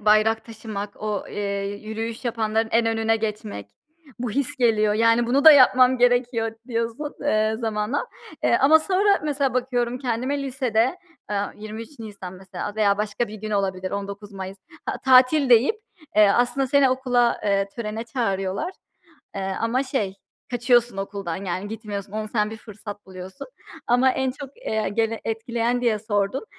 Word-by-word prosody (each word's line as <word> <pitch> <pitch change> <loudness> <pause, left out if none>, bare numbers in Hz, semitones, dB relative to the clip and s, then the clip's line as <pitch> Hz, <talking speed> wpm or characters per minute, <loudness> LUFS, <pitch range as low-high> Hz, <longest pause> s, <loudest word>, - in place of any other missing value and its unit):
bayrak 215 +1 +3
taşımak, 215 -3 -7
o, 210 -2 -2
eee, 200 -1 -3 0.2
yürüyüş 225 +2 -5
yapanların 225 -1 0
en 230 0 +3
önüne 225 0 +1
geçmek, 215 - -4 0.5
bu 240 -1 -3
his 275 +4 -2
geliyor. 215 -4 +3
Yani 230 +2 +3
bunu 270 +4 +2
da 315 - +12
yapmam 255 -2 +6
gerekiyor 245 -2 +2
d 225 - -19
diyorsun, 230 +5 -3
eee, 215 -6 +1
zamanla. 225 - -1 0.4
Eee, - - +4
ama 315 +4 +7
sonra 395 +4 +2
mesela 280 -4 0
bakıyorum 245 -1 -1
kendime 255 +3 -2
lisede, 255 0 0 0.3
aaa, 205 -1 -2
23 220 +6 -9
Nisan 200 -5 -8
mesela 190 +2 -7
veya 205 -2 +3
başka 210 +2 -1
bir 210 - -8
gün 215 0 -6
olabilir, 190 -2 -1
19 200 +1 -6
Mayıs, 190 0 -7 0.3
a - - -2
tatil 260 +2 +5
deyip, 245 - +5 0.4
eee, 210 -1 +7
aslında 245 +6 +2
seni 275 0 +4
okula, 250 -2 +1
eee, 200 -1 +1
törene 220 -1 -4
çağırıyorlar. 195 - -2 0.6
Eee, 195 -1 -3
ama 230 +3 +1
şey 255 -9 -2 0.4
kaçıyorsun 240 -2 +2
okuldan, 195 -3 -4
yani 185 +3 -3
gitmiyorsun, 205 -3 -6
onu 215 0 -3
sen 210 -2 +1
bir 220 - -7
fırsat 210 -2 -10
buluyorsun. 185 0 -9 0.4
Ama 245 +2 +4
en 265 0 0
çok, 275 +1 -10
eee, 220 - -2
gene 225 +1 -1
etkileyen 235 +2 -1
diye 235 -3 +1
sordun. 205 - -1
225 Hz, 155 wpm, -23 LUFS, 205-250 Hz, 0.6 s, da